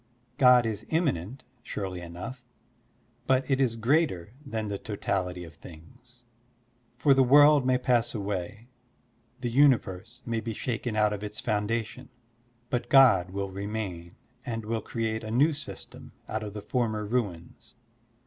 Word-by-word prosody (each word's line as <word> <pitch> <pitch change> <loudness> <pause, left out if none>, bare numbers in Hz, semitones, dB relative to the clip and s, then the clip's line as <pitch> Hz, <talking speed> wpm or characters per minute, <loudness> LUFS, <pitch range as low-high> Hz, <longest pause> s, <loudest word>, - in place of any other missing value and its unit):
God 125 -2 +7
is 110 -3 -3
immanent, 135 - -1 0.2
surely 95 -6 -5
enough, 90 +10 -8 0.8
but 130 0 +2
it 135 -1 +1
is 120 -4 +2
greater 115 - +1
than 110 -6 -4
the 100 -1 -4
totality 95 -4 -3
of 80 -1 -11
things. 120 - -16 0.7
For 140 +3 +4
the 135 - +4
world 145 +1 +6
may 130 0 +4
pass 125 -2 +1
away, 105 +2 -4 0.7
the 120 -2 -2
universe 120 -9 +2
may 115 -1 -1
be 110 -1 -5
shaken 120 -1 -3
out 105 -1 +3
of 105 0 -5
its 105 0 -6
foundation, 115 +3 -2 0.6
but 120 -1 -2
God 115 -10 +6
will 100 0 -4
remain 100 -4 -5 0.3
and 115 -2 -4
will 110 0 -2
create 110 0 -3
a 110 - -6
new 140 +8 +3
system 145 0 -9
out 110 - -3
of 105 -1 -7
the 105 - -6
former 110 -2 -1
ruins. 105 0 -4
110 Hz, 145 wpm, -28 LUFS, 100-125 Hz, 0.8 s, God